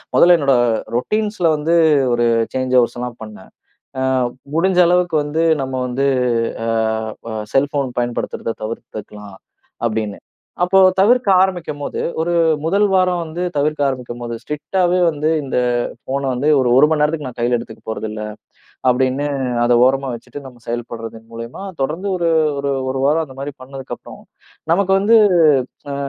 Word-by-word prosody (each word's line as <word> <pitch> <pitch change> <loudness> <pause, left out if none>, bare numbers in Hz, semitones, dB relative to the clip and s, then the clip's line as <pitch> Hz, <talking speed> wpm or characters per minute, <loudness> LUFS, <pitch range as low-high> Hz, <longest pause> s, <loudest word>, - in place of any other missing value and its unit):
முதல்ல 175 0 +6
என்னோட 140 -2 +3 0.4
ரூட்டின்ஸ்ல 210 - 0
வந்து 155 +3 0 0.4
ஒரு 120 0 +2 0.3
சேஞ்சு 130 0 +1
ஓவர்ஸ்ல்லாம் 120 0 -4
பண்னேன். 105 -3 -12 0.5
ஆ - - -1 0.5
முடிஞ்ச 180 +2 +2
அளவுக்கு 175 -2 +2
வந்து 155 +3 -1 0.2
நம்ம 130 0 -5
வந்து 135 +3 0 0.6
அ - - -2 0.6
ப 110 -1 -4 0.2
செல்ஃபோன் 140 -2 +1
பயன்படுத்துறத 120 -1 -3
தவிர்த்துக்கலாம் 105 -2 -8 0.5
அப்படின்னு. 110 -3 -2 0.5
அப்போ 190 +2 +3 0.2
தவிர்க்க 240 +3 +4
ஆரம்பிக்கும்போது 170 -6 -3 0.2
ஒரு 175 +2 0 0.3
1 200 +5 +2
வாரம் 180 -2 +2
வந்து 165 +3 -5
தவிர்க்க 150 +1 0
ஆரம்பிக்கும்போது, 120 -2 -5
ஸ்ட்ரிக்டாவே 180 +5 0
வந்து 150 0 -2
இந்த 130 -2 -2 0.5
போன் 140 +1 -2
வந்து 125 +5 -1
ஒரு 125 - +1
1 145 +3 +7
மணி 155 - +1
நேரத்துக்கு 150 -1 0
நான் 125 - -11
கையில 120 +1 +2
எடுத்துக்க 110 -1 -10
போறதில்லை. 110 -1 -5 0.6
அப்படின்னு 130 +3 +1 0.4
அதை 120 0 +3
ஓரமா 135 +1 +1
வச்சுட்டு 120 +4 -10
நம்ம 125 -2 -13
செயல்படுறதன் 115 -1 -6
மூலியமா 115 +9 -8 0.2
தொடர்ந்து 165 +9 -2
ஒரு 170 -2 0 0.3
ஒரு 140 0 -1 0.2
1 130 - -2
வாரம் 160 +2 +2
அந்த 135 -2 -14
மாதிரி 140 +1 -5
பண்ணதுக்கு 135 0 -7
அப்புறம், - - -13 0.5
நமக்கு 190 +2 +2
வந்து 220 +4 +5 0.8
அ - - -3
140 Hz, 140 wpm, -18 LUFS, 120-165 Hz, 0.8 s, 1